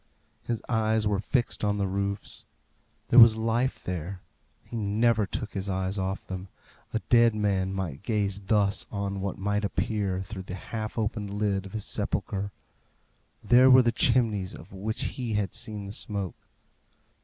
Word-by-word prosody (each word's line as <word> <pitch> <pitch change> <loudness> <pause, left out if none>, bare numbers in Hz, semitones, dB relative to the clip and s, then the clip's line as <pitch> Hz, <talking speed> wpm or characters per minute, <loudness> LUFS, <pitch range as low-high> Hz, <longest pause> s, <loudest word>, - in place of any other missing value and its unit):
His 115 +1 -3
eyes 110 -2 +1
were 100 -2 +1
fixed 120 +3 -1
on 105 0 +1
the 100 - 0
roofs. 100 +1 -3 0.6
There 125 - +8
was 115 -2 +9
life 115 +4 0
there. 90 +1 -4 0.4
He - - -9
never 110 0 +2
took 110 - -4
his 100 0 -3
eyes 95 +1 -1
off 95 +1 -3
them. 95 0 -6 0.4
A - - 0
dead 115 -2 +5
man 100 -3 0
might 90 -7 -4
gaze 100 -2 -1
thus 100 0 +1
on 100 -1 -3
what 100 -1 -3
might 100 +2 -1
appear 100 -2 -1
through 95 +1 -7
the 90 - -3
half 110 +3 -5
opened 105 -2 -2
lid 100 -2 0
of 95 - -14
his 110 -2 -3
sepulchre. 100 0 -2 0.9
There 125 +2 +6
were 130 0 +8
the 120 - +3
chimneys 110 -5 +2
of 90 - -13
which 105 +3 -3
he 120 -4 -3
had 105 -3 -1
seen 110 -3 -3
the 100 - -6
smoke. 100 -3 -5
105 Hz, 165 wpm, -27 LUFS, 95-110 Hz, 0.9 s, was